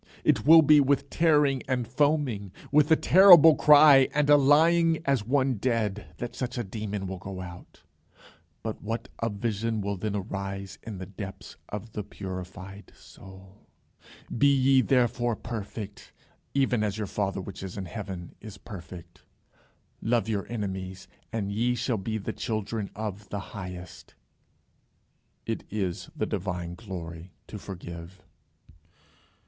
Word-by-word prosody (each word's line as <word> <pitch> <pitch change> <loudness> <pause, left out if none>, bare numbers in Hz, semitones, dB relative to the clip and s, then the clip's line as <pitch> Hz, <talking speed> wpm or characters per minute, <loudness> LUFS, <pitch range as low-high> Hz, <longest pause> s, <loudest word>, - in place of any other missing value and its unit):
It - - +2
will 165 0 +9
be 150 0 +6
with 140 0 +1
tearing 150 -5 +3
and 125 -3 -1
foaming, 130 - 0 0.2
with 150 +1 +4
a 160 - +7
terrible 175 -3 +8
cry 145 -3 +7
and 150 0 +3
a - - +9
lying 160 +4 +4
as 135 -7 0
one 130 -2 +1
dead, 105 -3 -1
that 120 - -5
such 125 -1 -4
a 120 - -1
demon 105 -1 -5
will 95 -1 -5
go 95 0 -7
out. 90 -1 -11 0.8
But 110 -1 -5
what 115 +3 -4
a 115 - 0
vision 110 +1 -2
will 100 0 -3
then 105 +2 -3
arise 100 -1 -5
in 110 -4 -7
the 95 - -6
depths 100 0 -9
of 105 +2 -6
the 105 - -4
purified 95 0 -8
soul! 95 +1 -15 0.7
"Be 140 +4 +4
ye 135 -1 +4
therefore 120 -2 +1
perfect, 105 -2 -7 0.4
even 130 -4 +2
as 105 0 -2
your 110 - -2
father 100 0 -2
which 95 0 -8
is 95 +1 -7
in 95 - -4
heaven 95 -3 -7
is 105 -2 -10
perfect." 90 -5 -11 0.8
"Love 115 -2 +1
your 105 -3 -2
enemies, 95 -4 -5 0.2
and 105 -4 -3
ye 120 +4 +1
shall 120 0 -1
be 110 +3 -3
the 100 - -5
children 110 -1 -3
of 105 -1 -6
the 100 - -3
highest." 90 -4 -9 1.3
It - - -3
is 95 -4 -3
the - - -1
divine 90 -2 -4
glory 90 -4 -8
to 105 - -8
forgive. 85 -1 -9
105 Hz, 145 wpm, -27 LUFS, 95-125 Hz, 1.3 s, will